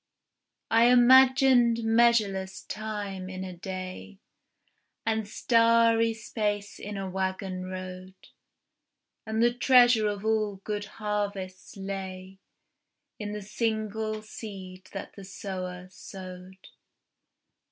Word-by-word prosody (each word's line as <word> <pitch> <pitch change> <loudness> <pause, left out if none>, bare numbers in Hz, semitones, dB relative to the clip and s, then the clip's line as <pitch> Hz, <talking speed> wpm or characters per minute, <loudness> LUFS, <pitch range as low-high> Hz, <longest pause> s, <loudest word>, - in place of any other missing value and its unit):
I 230 +1 +6
imagined 250 -1 +6
measureless 215 -5 +2
time 205 -3 -5
in 185 0 -6
a 185 -1 -7
day, 185 +2 -7 0.9
And 220 -2 0
starry 230 0 +3
space 210 -2 -3
in 205 0 -6
a 195 -1 -4
waggon 190 0 -3
road, 185 0 -7 1.1
And 220 +1 +1
the 240 0 +4
treasure 245 -3 +5
of 205 0 -3
all 215 -2 +1
good 205 -1 -3
harvests 200 -3 -4
lay 190 -1 -6 0.8
In 210 -1 -4
the 210 -1 -5
single 215 0 -2
seed 190 -4 -9
that 195 - -7
the 200 - -10
sower 185 -2 -6
sowed. 185 0 -11
205 Hz, 100 wpm, -28 LUFS, 190-225 Hz, 1.1 s, I